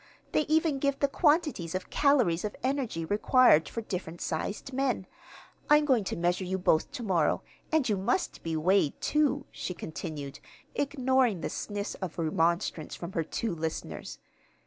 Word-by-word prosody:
They 305 - +1
even 310 -2 +2
give 280 0 +1
the 280 - +2
quantities 295 - +1
of 185 - -4
calories 250 - +3
of 210 - -3
energy 255 - -1
required 205 - +4
for 230 - -4
different 180 -5 -5
sized 200 +10 -3
men. 255 -7 0 0.6
I'm 295 0 +6
going 250 -8 +3
to - - -2
measure 175 +2 0
you 185 +1 -2
both 175 - +2
to 255 -4 -5
morrow; 180 -7 +1 0.3
and 315 -4 +2
you 210 -3 +1
must 190 0 -1
be 165 -1 -2
weighed, 175 -1 +2
too," 290 -2 +1
she 180 - -5
continued, 150 -4 -6 0.3
ignoring 260 - +1
the - - -3
sniffs 205 -1 -4
of 185 -3 -5
remonstrance 165 0 0
from 170 +1 -7
her 165 -3 -1
two 215 +5 -3
listeners. 160 -1 -5
200 Hz, 160 wpm, -29 LUFS, 170-270 Hz, 0.6 s, I'm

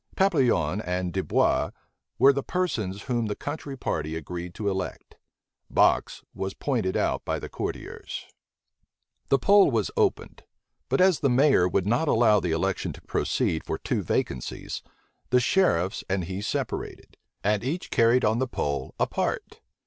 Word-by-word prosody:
Papillon 125 - +2
and 90 -2 -2
Dubois 95 - +1 0.5
were 135 +3 +6
the 140 - -1
persons 110 - -2
whom 120 -4 -1
the 105 - -2
country 145 -2 -6
party 80 -9 -2
agreed 85 +2 -6
to 105 - -3
elect: 95 -2 -4 0.5
Box - - +2
was 95 0 -4
pointed 115 -10 -1
out - - 0
by - - -1
the - - -6
courtiers. - - -6 1.0
The 135 - +5
poll 200 +8 +5
was - - 0
opened; 435 -4 0 0.5
but - - +2
as 185 -3 +5
the 140 - +2
mayor 130 -7 +4
would 90 +1 0
not 120 +9 +1
allow 110 -5 +4
the 90 - -2
election 80 0 -1
to - - -13
proceed 80 - 0
for - - -3
two - - -2
vacancies, 65 -2 -3 0.5
the 125 - +4
sheriffs 110 - +2
and 95 -1 0
he 95 +3 -5
separated, 105 - -4 0.3
and 105 +1 +1
each 160 +9 -3
carried 115 +2 +4
on 110 +2 +2
the 130 - 0
poll 70 - -3
apart. - - -2
110 Hz, 150 wpm, -26 LUFS, 90-140 Hz, 1.0 s, were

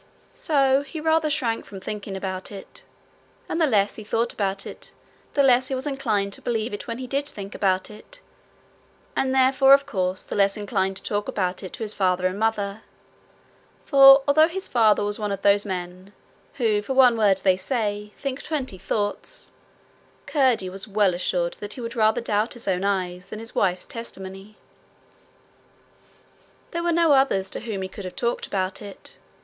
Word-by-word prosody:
So 275 -3 +2
he 285 +3 -7
rather 320 0 +2
shrank 245 -7 -1
from 195 - -10
thinking 200 0 -5
about 190 0 -5
it, 200 -1 -8 0.7
and 335 - -2
the 320 - +4
less 205 -5 +2
he 215 - -7
thought 230 +3 -1
about 195 -1 -2
it, - - -9 0.4
the 280 - +4
less 255 -1 +4
he 265 - -2
was 260 +2 -4
inclined 220 -9 -1
to - - -6
believe 225 -1 -2
it 205 +7 -6
when 230 -1 -4
he 255 - -5
did 275 +3 -2
think 200 -4 -7
about 190 0 0
it, 360 - -8 1.0
and 265 - +1
therefore, 265 +1 +6
of 280 0 -2
course, 185 -8 -2
the - - -6
less 200 0 +2
inclined 195 -2 -1
to - - -7
talk 205 0 -2
about 185 -2 -2
it 185 - -8
to - - -5
his 215 -1 0
father 185 -2 +1
and 185 +2 -1
mother; 215 -2 -1 1.0
for 275 -1 +8
although 310 +3 +6
his 375 +3 -5
father 220 -4 +3
was 205 +1 -2
one 210 -1 -2
of 195 0 -4
those 200 +1 +4
men 185 +1 -6 0.4
who 220 -5 +1
for 265 +6 -4
one 255 -3 +6
word 205 -4 +3
they 190 -2 +4
say 210 0 -3
think 275 -1 -4
twenty 265 - -4
thoughts, 205 - -3 0.7
Curdie 255 -10 +2
was 190 +2 -7
well 205 -2 +2
assured 175 -1 -1
that 205 0 -5
he 250 - -8
would 230 0 -5
rather 220 +1 +3
doubt 215 0 0
his 240 - -10
own 185 -1 0
eyes 185 -2 -2
than - - -6
his 225 +1 -8
wife's 180 -2 0
testimony. 195 -3 -8 2.1
There 340 - -2
were 345 0 +1
no 335 -1 +3
others 265 -9 +3
to - - -3
whom 215 -5 -4
he - - -3
could 190 +1 -9
have 180 - -7
talked 240 0 -1
about 190 -1 -2
it. 200 -2 -9
210 Hz, 185 wpm, -24 LUFS, 195-260 Hz, 2.1 s, for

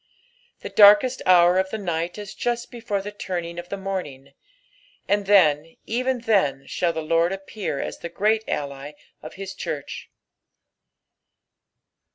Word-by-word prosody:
The - - -6
darkest 210 +5 +6
hour 180 0 +6
of 190 0 -1
the 220 - -4
night 175 -3 -3
is 205 -1 -8
just 240 -1 -3
before 210 -5 -3
the 205 - -6
turning 175 -4 -5
of 175 0 -9
the 200 - -4
morning; 150 -9 -6 0.7
and 205 -1 0
then, 165 -5 +4
gtco 250 0 -1
then, 145 -11 +1
shall 175 -1 -1
the 160 -1 -4
Lord 165 +2 +2
appear 195 -5 -5
as - - -5
the 170 - -6
great 215 +5 +1
ally 140 0 -4 0.3
of 155 - -10
his 195 0 -7
cliurrh. 150 -6 -6
190 Hz, 145 wpm, -23 LUFS, 165-205 Hz, 0.7 s, darkest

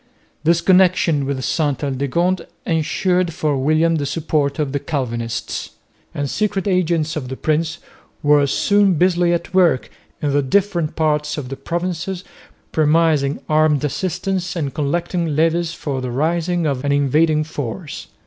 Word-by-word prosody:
This 170 +1 +3
connection 180 -6 +3
with 135 -2 -2
Sainte 150 -4 0
Aldegonde 145 +7 0 0.2
ensured 175 +2 +1
for 150 -2 0
William 155 +4 +2
the 145 -2 -2
support 150 -2 -1
of 150 -3 -1
the 140 - -1
Calvinists; 120 -6 -3 0.4
and 145 -1 -1
secret 205 +4 -1
agents 170 -4 +1
of 135 -5 -4
the 130 - -4
prince 155 +1 0 0.5
were 145 -1 +4
soon 200 +6 +3
busily 175 +1 +3
at 170 +1 -2
work 175 -8 +3 0.3
in 145 - -1
the 145 - +3
different 170 +1 0
parts 150 -1 0
of 135 -4 -5
the 135 - -4
provinces 175 +4 -3 0.5
promising 155 -2 +2
armed 155 -1 +3
assistance 185 +5 -2
and 145 -5 -2
collecting 165 +1 -1
levies 165 +2 +1
for 135 -3 -3
the 130 - -3
raising 170 +6 0
of 140 -3 -1
an 140 - 0
invading 150 +3 +2
force. 150 +1 -6
155 Hz, 145 wpm, -20 LUFS, 145-175 Hz, 0.5 s, were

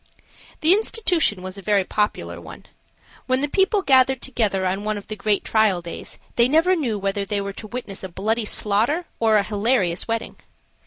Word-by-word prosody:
The 320 +4 +6
institution 360 - +1
was 185 +1 -7
a - - -9
very 200 0 +2
popular 85 - -2
one. 80 - -12 0.6
When 255 +1 +1
the 290 - 0
people 385 +5 +1
gathered 265 -2 +4
together 215 -8 -1
on 190 +2 -1
one 215 0 -2
of 205 - -8
the 215 - -6
great 210 -1 0
trial 215 -5 +2
days, 170 0 -8 0.2
they 235 0 +5
never 325 +7 +3
knew 250 -11 -1
whether 200 0 -2
they 200 +1 -2
were 200 0 -4
to 215 - -9
witness 215 -4 -6
a 190 - -5
bloody 220 +5 -1
slaughter 225 - +1
or 220 -1 +4
a 205 - +2
hilarious 205 -4 0
wedding. 225 0 -3
215 Hz, 190 wpm, -22 LUFS, 195-260 Hz, 0.6 s, The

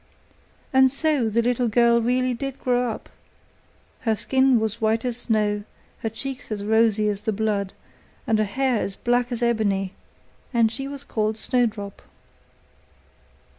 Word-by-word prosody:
And 265 0 +6
so 280 -3 +1
the 230 +2 +1
little 245 0 +1
girl 235 +1 +4
really 250 +2 +1
did 270 +2 -5
grow 245 -1 +1
up; 220 - -6 0.9
her 225 -2 +1
skin 260 +4 +3
was 220 0 -2
as - - -27
white 225 +2 +1
as 245 -2 0
snow, 210 -3 0 0.4
her 225 - -2
cheeks 260 +3 -5
as 205 -1 -3
rosy 220 0 +3
as 205 -1 -1
the 220 +1 -1
blood, 205 -2 -1 0.5
and 225 -4 +2
her 215 - +2
hair 255 +4 0
as 195 -2 -2
black 245 +1 0
as 240 0 -2
ebony; 200 -5 +1 0.6
and 230 -3 +3
she 270 +3 -4
was 280 0 -6
called 215 -4 -1
Snowdrop. 220 -4 -1
230 Hz, 155 wpm, -24 LUFS, 215-250 Hz, 0.9 s, And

